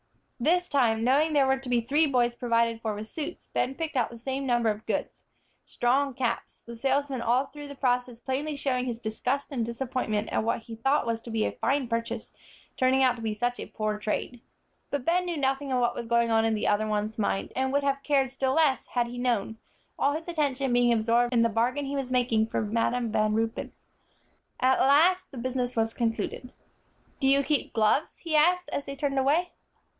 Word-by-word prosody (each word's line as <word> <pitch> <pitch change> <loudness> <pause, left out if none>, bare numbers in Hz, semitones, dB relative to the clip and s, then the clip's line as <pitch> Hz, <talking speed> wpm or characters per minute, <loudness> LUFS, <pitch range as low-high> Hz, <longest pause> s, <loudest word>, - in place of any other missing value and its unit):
This 355 +8 +2
time, 230 -7 +2
knowing 290 +6 +3
there 280 -2 +4
were 265 0 +2
to 265 -1 -8
be 240 -1 +2
three 295 +7 +2
boys 245 -3 +2
provided 230 -1 0
for 220 -2 -2
with 210 +1 -6
suits, 315 +7 -6
Ben 265 - 0
picked 320 -1 -4
out 245 -3 +1
the 235 - -10
same 265 +3 -3
number 240 -2 +2
of 210 +1 -8
good, - - 0 0.6
strong 265 +2 +1
caps, 245 -3 -3
the 235 - -8
salesman 270 +1 0
all 240 +3 +2
through 290 +1 -10
the 285 - -9
process 250 -2 0
plainly 280 +4 -3
showing 260 -3 -1
his 240 -2 -3
disgust 245 +5 -2
and 250 -4 -1
disappointment 235 -3 -2
at - - 0
what 230 - -1
he 225 0 -9
thought 270 +5 +1
was 230 -1 -2
to 235 - -10
be 220 -1 0
a - - -1
fine 275 -2 0
purchase, 230 0 -3 0.4
turning 260 +1 +3
out 255 -2 +4
to - - -9
be 220 -1 -2
such 245 +3 -1
a - - -6
poor 215 -1 -3
trade. 220 +3 -3 0.5
But 285 -3 -3
Ben 360 +2 +2
knew 345 -2 -3
nothing 270 0 -1
of 255 - +2
what 240 -1 +2
was 235 - -6
going 235 0 +2
on 225 0 +3
in 225 -1 +1
the 210 - -1
other 210 +1 +2
one's 215 +1 -2
mind, 200 -2 -1
and 265 0 0
would 285 +1 +1
have 275 0 0
cared 275 -3 +1
still 265 0 0
less, 305 -5 +2
had 245 -1 0
he 245 +1 -7
known, 225 -3 -1 0.4
all 280 - +2
his 320 +3 -5
attention 280 -6 0
being 245 0 +4
absorbed 235 +2 +2
in 235 -2 +3
the 230 - +3
bargain 245 +6 0
he 280 +1 -3
was 270 -2 -3
making 240 -3 +2
for 220 - -1
Madam 230 +2 0
Van 215 -1 +1
Ruypen. 225 0 -2 0.9
At 260 +1 +3
last 335 +7 +4
the 270 - -11
business 250 0 -2
was 225 0 0
concluded. 235 +1 -2 0.7
"Do 270 - +1
you 275 +1 +4
keep 295 0 -1
gloves?" 225 +7 +1
he 330 -2 -3
asked, 360 +4 +3
as 285 - -3
they 275 - -5
turned 275 -1 -1
away. 310 +7 +2
250 Hz, 215 wpm, -27 LUFS, 230-275 Hz, 0.9 s, there